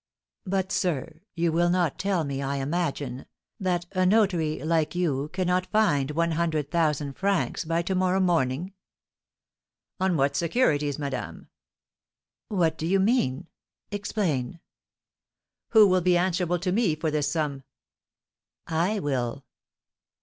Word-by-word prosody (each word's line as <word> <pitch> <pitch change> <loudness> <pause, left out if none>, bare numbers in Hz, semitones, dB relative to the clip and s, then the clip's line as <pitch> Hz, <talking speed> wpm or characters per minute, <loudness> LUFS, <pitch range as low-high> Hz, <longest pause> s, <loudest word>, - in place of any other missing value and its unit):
"But, 190 0 -1
sir, 160 -4 -2
you 170 -1 +1
will 175 +2 +2
not 175 -4 +1
tell 195 -4 0
me, 140 -2 -3
I 140 0 -2
imagine, 140 -3 -2 0.3
that 180 -3 -1
a 185 -1 +1
notary, 185 -6 +2
like 160 0 0
you, 150 -5 0
cannot 185 0 0
find 150 -11 +2
one 170 +2 0
hundred 155 -3 -1
thousand 150 -4 0
francs 195 0 -1
by 165 +1 0
to 190 - -2
morrow 185 0 +2
morning?" 170 -1 0 1.3
"On 185 -2 +1
what 140 0 +1
securities, 150 - +1
madame?" 140 -3 -5 1.0
"What 165 -6 0
do 160 - -2
you 195 +2 +3
mean? 190 - +1 0.5
Explain!" 180 - -2 1.1
"Who 220 -2 +7
will 185 -1 +3
be 180 0 +3
answerable 180 -1 +1
to 180 +1 -2
me 195 -5 +2
for 155 0 -2
this 150 -1 0
sum?" 145 -4 -2 1.0
"I 170 +6 0
will." 130 -3 -2
170 Hz, 130 wpm, -26 LUFS, 150-185 Hz, 1.3 s, Who